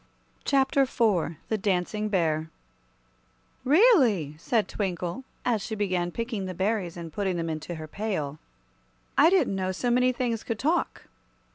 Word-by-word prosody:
Chapter 275 0 +3
IV 215 -11 +1
The 220 - 0
Dancing 200 +2 0
Bear 160 -5 0 1.1
"REALLY," 265 - +4
said 220 +4 +1
Twinkle, 185 +4 -3 0.2
as 230 -4 +1
she 220 +2 -4
began 185 -4 0
picking 225 0 -3
the 185 - -5
berries 190 -2 -1
and 165 -2 -7
putting 190 -3 -1
them 165 -1 -2
into 155 +2 -5
her 155 -1 -7
pail, 155 -7 -3 0.8
"I 315 - +6
didn't 365 - +3
know 190 -1 -1
so 240 +6 -1
many 250 +1 +4
things 240 -3 -2
could 230 - -3
talk." 320 +9 0
205 Hz, 145 wpm, -27 LUFS, 175-240 Hz, 1.1 s, I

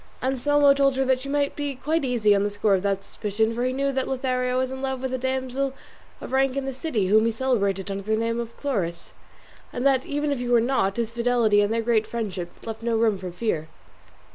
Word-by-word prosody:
Anselmo 280 +2 +4
told 275 -1 +2
her 265 0 +2
she 260 +2 -8
might 285 0 0
be 290 -2 -3
quite 310 +5 -1
easy 235 -5 +3
on 200 - +2
the 205 - +1
score 205 0 +1
of 190 - +2
that 195 0 -1
suspicion, 220 +2 -1
for 240 +1 -2
he 255 - +1
knew 275 +1 0
that 265 -1 -1
Lothario 255 -1 -1
was 260 0 0
in 265 0 -6
love 265 -1 -2
with 260 0 -3
a - - 0
damsel 260 +1 -2 0.4
of - - -8
rank 265 0 +2
in 275 - -1
the 270 - -3
city 255 - -1
whom 215 +4 +4
he - - +2
celebrated 200 -6 0
under 195 0 -3
the 220 +2 0
name 230 +1 -1
of 235 -1 -6
Chloris, 195 -12 -3 0.6
and 245 - -3
that 265 -2 +4
even 290 0 -1
if 280 - -1
he 245 - -3
were 240 -1 +4
not, 230 -5 +1
his 230 -1 -1
fidelity 235 -3 +3
and 205 +1 +1
their 230 0 0
great 225 -2 +2
friendship 195 -7 -4 0.2
left 225 0 -6
no 230 -1 0
room 220 -3 +2
for 185 -1 -6
fear. 170 -5 -2
245 Hz, 235 wpm, -25 LUFS, 215-265 Hz, 0.6 s, Anselmo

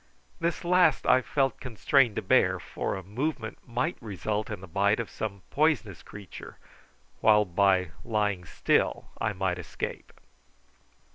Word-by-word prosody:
This 170 +1 -2
last 180 -4 +4
I 130 - +5
felt 135 +1 0
constrained 125 0 +2
to - - -2
bear, - - +3
for - - -4
a 95 - -6
movement 115 - -3
might 125 +7 -2
result 105 0 -3
in 105 -3 -5
the 95 - -11
bite 100 +5 +2
of 115 - -4
some 100 -3 -5
poisonous 145 - +1
creature, 100 -3 -11 0.6
while 105 -1 +5
by 95 -1 +2
lying 105 -5 0
still - - 0
I 110 -2 0
might 90 -2 -1
escape. 90 - -6
105 Hz, 140 wpm, -28 LUFS, 100-130 Hz, 0.6 s, I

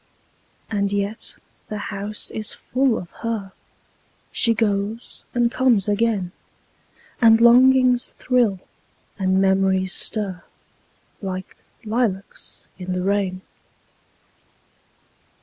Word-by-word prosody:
And 200 -2 0
yet 205 +2 -3 0.3
the 215 - -4 0.2
house 205 +2 -5
is 215 -1 -2
full 260 -2 0
of 175 - -8
her; 220 -4 -3 0.8
She 230 -1 +2
goes 210 +1 -2
and 240 -1 +2
comes 240 -7 +2
again; 205 -3 0 0.9
And 225 -1 +7
longings 250 +1 +5
thrill, 240 -7 +1 0.6
and 190 0 +2
memories 190 -1 +2
stir, 195 -5 -2 0.8
Like 185 -2 -5 0.3
lilacs 215 -3 -3
in 185 0 -4
the 180 0 -2
rain. 195 -1 0
205 Hz, 95 wpm, -22 LUFS, 190-230 Hz, 0.9 s, And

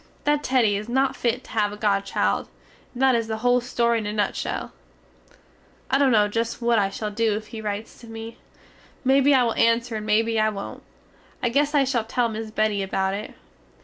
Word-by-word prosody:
That 295 0 +2
Teddy 245 -7 +2
is 210 +3 -6
not 265 +2 +1
fit 245 +1 -1
to - - -16
have 210 -2 +1
a 210 - -8
godchild, 200 -2 0 0.4
and 255 +1 -2
that 265 -1 +5
is 230 -2 0
the 220 0 -3
hole 245 0 +4
story 235 -1 +1
in 215 - -4
a 210 - -3
nutshell. 210 -1 -2 1.2
I 270 - +3
dunno 230 -7 +4
just 230 +2 -2
what 235 -2 +2
I 195 -1 +1
shall 210 +2 -4
do 220 0 +1
if 215 0 -9
he 220 - -5
rites 210 +1 -5
to 235 - -13
me. 225 0 -8 0.7
Mebbe 270 +1 +4
I 270 -3 +5
will 230 -2 +1
anser 230 0 +2
and 215 0 -6
mebbe 225 +1 +2
I 215 0 +3
wont. 200 -2 -7 0.6
I 240 - +2
guess 290 +4 +1
I 285 - +5
shall 255 -4 0
tell 240 +1 0
miss 220 0 -5
Betty 215 -2 0
about 190 0 -1
it. 205 +2 -6
225 Hz, 205 wpm, -24 LUFS, 215-245 Hz, 1.2 s, that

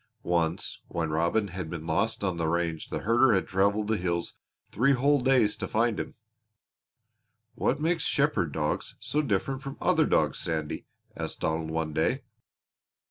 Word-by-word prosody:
Once 85 0 0
when 80 -2 -2
Robin 85 +7 +1
had 90 -2 -5
been 80 -1 -6
lost 110 +7 0
on 95 -3 0
the 80 -1 0
range 85 -1 -1
the - - -3
herder 115 +1 +4
had 95 - +1
traveled 100 +2 +1
the 110 0 +1
hills 85 -2 -2 0.4
three 135 +6 +3
whole 140 +2 +3
days 125 -5 +3
to - - -4
find 115 -1 +1
him. - - -5 1.4
"What 135 - 0
makes 165 +2 +1
shepherd 140 - +1
dogs 75 +1 -2
so 150 - 0
different 135 +2 -1
from 135 0 -7
other 160 -4 +3
dogs, 75 -3 +2
Sandy?" 80 -2 -3 0.3
asked - - -5
Donald 80 0 -1
one 80 -1 -2
day. - - +1
95 Hz, 160 wpm, -28 LUFS, 80-125 Hz, 1.4 s, herder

